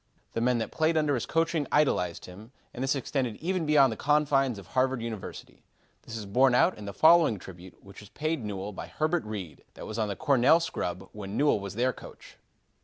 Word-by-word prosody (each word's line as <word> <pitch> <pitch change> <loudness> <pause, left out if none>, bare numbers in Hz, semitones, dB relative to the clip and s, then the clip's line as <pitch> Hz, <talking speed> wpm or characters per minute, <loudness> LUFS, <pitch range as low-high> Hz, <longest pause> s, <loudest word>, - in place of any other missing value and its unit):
The 115 - -2
men 125 +1 +2
that 115 - -3
played 160 +1 +1
under 150 -2 +2
his 120 - -2
coaching 165 -3 0
idolized 90 - +1
him, 105 +6 -12 0.2
and 125 - -4
this 135 +1 +1
extended 130 -3 -2
even 175 - -2
beyond 140 -4 +5
the - - -7
confines 135 -3 +2
of 100 - -10
Harvard 130 +5 0
University. 115 -3 -7 0.4
This 115 - -8
is 110 - -6
borne 125 +5 +3
out 180 +8 +4
in 105 - -10
the 100 - -5
following 160 -4 +5
tribute 90 0 -13
which 100 0 -13
is 105 - -14
paid 155 -1 -3
Newell 100 -1 -5
by - - -7
Herbert 160 +2 -1
Reed, 95 -8 -7
that - - -9
was 110 +1 -5
on 110 - 0
the 100 - -3
Cornell 145 +1 +4
scrub 95 - -4
when 105 0 -7
Newell 145 -6 +3
was 100 0 -7
their 125 +3 +1
coach. - - -14
125 Hz, 210 wpm, -28 LUFS, 105-150 Hz, 0.4 s, beyond